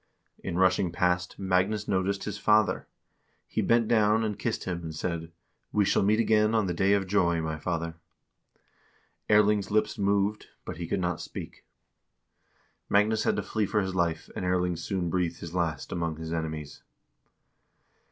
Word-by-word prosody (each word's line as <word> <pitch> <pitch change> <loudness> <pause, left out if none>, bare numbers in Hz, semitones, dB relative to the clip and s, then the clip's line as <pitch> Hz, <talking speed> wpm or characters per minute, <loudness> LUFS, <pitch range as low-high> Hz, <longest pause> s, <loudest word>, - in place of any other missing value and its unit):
In 85 - -3
rushing 95 -1 +3
past, 90 +1 0
Magnus 95 +2 0
noticed 95 +1 0
his 100 -1 -5
father; 105 +1 +3 0.6
he - - -2
bent 115 -1 +3
down 110 -1 +3
and 105 -3 -3
kissed - - -2
him 90 -2 -3
and 80 -2 -6
said: 85 0 -3 0.2
" - - -49
We 105 -1 +2
shall - - +2
meet 105 +3 +3
again 110 -1 +3
on 110 -2 +2
the 90 - -1
day 95 +3 +3
of 100 -1 +2
joy, 90 -3 +2
my 80 -1 -3
father." 85 0 -2 1.4
Erling's 105 -1 +4
lips 110 0 +1
moved, 100 +1 +1 0.2
but - - -6
he 85 -1 -5
could 95 - -1
not 90 -1 -1
speak. - - -8 1.2
Magnus 105 +2 +3
had - - +2
to - - -2
flee 110 -2 -1
for 105 +1 +1
his 95 -1 -3
life, 85 -3 0
and - - -4
Erling 90 -1 +1
soon 85 +1 -2
breathed 85 -2 -1
his 85 0 -8
last 85 -5 -2
among 85 -2 -2
his 80 0 -5
enemies. 80 -3 -4
95 Hz, 170 wpm, -28 LUFS, 85-105 Hz, 1.4 s, Erling's